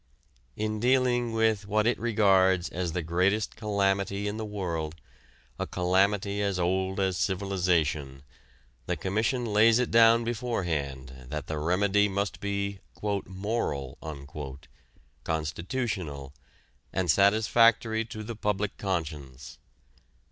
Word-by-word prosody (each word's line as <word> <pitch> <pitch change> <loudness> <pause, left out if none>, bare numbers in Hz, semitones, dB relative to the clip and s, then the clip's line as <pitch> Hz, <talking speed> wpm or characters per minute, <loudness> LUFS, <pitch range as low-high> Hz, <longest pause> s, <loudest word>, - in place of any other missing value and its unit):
In 110 0 -2
dealing 125 -1 +2
with 110 -2 +1
what 105 +1 +1
it 120 - +2
regards 95 -6 +3
as 85 -2 -3
the 90 - -2
greatest 95 +6 +1
calamity 100 -2 0
in 105 +1 -3
the 110 - -4
world, 85 -7 -3 0.6
a - - -2
calamity 100 +3 +1
as 100 -2 0
old 95 +2 0
as 95 -2 +1
civilization, 85 -8 0 0.6
the - - -1
Commission 110 +6 0
lays 110 +1 +5
it 125 -1 0
down 115 0 +6
beforehand 75 - -3
that 75 0 -4
the 80 -1 -3
remedy 100 +5 +2
must 100 -3 -2
be 100 0 -2 0.2
"moral," 100 - -3 1.2
constitutional, 80 - -3 0.6
and 90 -4 +2
satisfactory 110 +3 +4
to 110 -1 -8
the 115 +2 -6
public 105 -1 -2
conscience. 75 -8 -4
100 Hz, 110 wpm, -28 LUFS, 85-110 Hz, 1.2 s, down